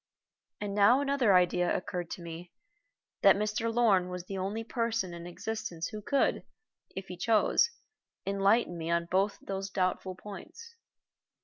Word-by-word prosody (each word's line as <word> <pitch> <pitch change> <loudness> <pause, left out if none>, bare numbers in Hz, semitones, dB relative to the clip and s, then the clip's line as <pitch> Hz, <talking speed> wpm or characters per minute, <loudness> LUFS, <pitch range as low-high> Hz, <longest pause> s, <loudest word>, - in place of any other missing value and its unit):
And 205 -1 -3
now 210 +6 +5
another 275 -8 +3
idea 180 0 +3
occurred 175 -1 -5
to 175 - -7
me, 170 +1 -8 0.7
that 195 - +7
Mr. 215 +3 -1
Lorn 210 -6 +3
was 180 -1 -5
the 195 - -6
only 195 +4 -3
person 230 -6 -1
in 170 0 -8
existence 175 -3 -4
who 215 - -7
could, 275 +6 +1 0.5
if 190 - -5
he 180 - -7
chose, 225 - +3 0.6
enlighten 195 -1 +2
me 165 0 -4
on 170 0 +1
both 195 +2 +2
those 195 0 -4
doubtful 185 0 -1
points. 210 - -11
195 Hz, 145 wpm, -30 LUFS, 180-220 Hz, 0.7 s, that